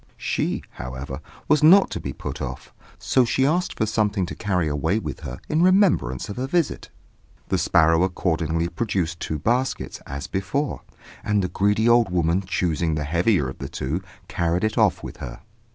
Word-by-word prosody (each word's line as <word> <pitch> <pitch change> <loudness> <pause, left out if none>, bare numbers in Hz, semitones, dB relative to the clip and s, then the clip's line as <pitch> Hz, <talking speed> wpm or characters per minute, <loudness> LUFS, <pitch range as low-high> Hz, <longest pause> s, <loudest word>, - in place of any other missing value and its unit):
She, - - -1
however, 65 +2 -7 0.3
was 150 - +4
not 185 +6 +7
to - - -3
be 70 -5 -5
put - - -6
off; - - -6 0.2
so 130 - +2
she 130 +2 +1
asked 175 +5 0
for 110 - +1
something 105 -3 0
to 85 - -6
carry 90 -5 -1
away 80 +7 0
with 75 -10 -5
her 60 - -7
in 155 +2 +1
remembrance 180 - +3
of 100 - -7
her 130 +1 -2
visit. 170 +1 -1 0.6
The - - +1
sparrow 80 0 +4
accordingly 85 -3 0
produced 90 -4 -2
two 80 - -3
baskets, 120 - -1
as 70 0 -5
before, 100 +10 -2 0.4
and 105 -2 +1
the 90 - -1
greedy 105 +4 +2
old 120 -1 +5
woman, 85 0 +1
choosing 85 -4 -1
the 75 - -2
heavier 85 - +2
of 65 - -8
the - - -5
two, 75 +8 -3 0.3
carried 85 +2 0
it 110 0 0
off - - +2
with - - -7
her. - - -8
90 Hz, 180 wpm, -23 LUFS, 80-115 Hz, 0.6 s, not